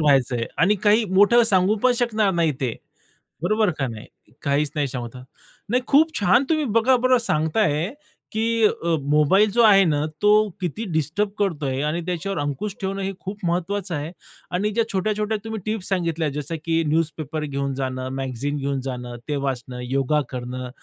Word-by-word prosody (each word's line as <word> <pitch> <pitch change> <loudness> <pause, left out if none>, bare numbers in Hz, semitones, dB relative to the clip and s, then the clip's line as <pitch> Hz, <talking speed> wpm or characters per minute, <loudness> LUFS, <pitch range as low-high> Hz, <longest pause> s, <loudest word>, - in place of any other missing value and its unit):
व्हायचंय 130 -5 +2
आणि 195 +5 +4
काही 215 +2 +5
मोठं 220 +5 +6
सांगू 195 -2 +3
पण 255 -1 +5
शकणार 220 -4 +2
नाही 165 -2 +2
ते, 125 -4 -1 0.7
बरोबर 215 +3 +2
का 135 -2 -1
नाही? 110 -2 -8 0.4
काहीच 140 +1 +1
नाही 145 -2 0
सांगू 125 -2 -5
शकणार. 125 +1 -12 0.5
नाही 250 +3 +1
खूप 315 +3 +4
छान 200 +6 +4
तुम्ही 310 -2 +1
बघा 230 +3 +3
बरं 255 +1 +3
सांगताय 160 - 0 0.4
की 225 +1 0
अ, 170 -5 +1 0.2
मोबाईल 170 +8 +4
जो 235 - +3
आहे 200 -3 +7
ना 150 -2 +1 0.2
तो 210 0 +5 0.3
किती 185 +6 -3
डिस्टर्ब 160 +7 0
करतोय? 145 -9 -1
आणि 155 +3 -1
त्याच्यावर 180 +1 -3
अंकुश 145 +8 -3
ठेवणं 195 +1 -2
हे 195 - -2
खूप 195 0 -7
महत्वाचं 180 +1 -1
आहे. 150 +3 -4 0.4
आणि 190 +4 0
ज्या 230 +2 +1
छोट्या-छोट्या 210 +2 0
तुम्ही 220 -1 -4
टिप्स 215 -3 -3
सांगितल्या 170 -5 0
जसं 150 +3 -4
की 165 0 +1
न्यूजपेपर 155 -1 -1
घेऊन 140 -1 -2
जाणं, 130 -1 -3
मॅगझीन 135 +2 -3
घेऊन 140 -1 -2
जाणं, 125 -2 -5
ते 150 - -1
वाचणं, 130 -3 -3
योगा 135 +3 +1
करणं 125 0 -5
170 Hz, 170 wpm, -23 LUFS, 140-210 Hz, 0.7 s, आहे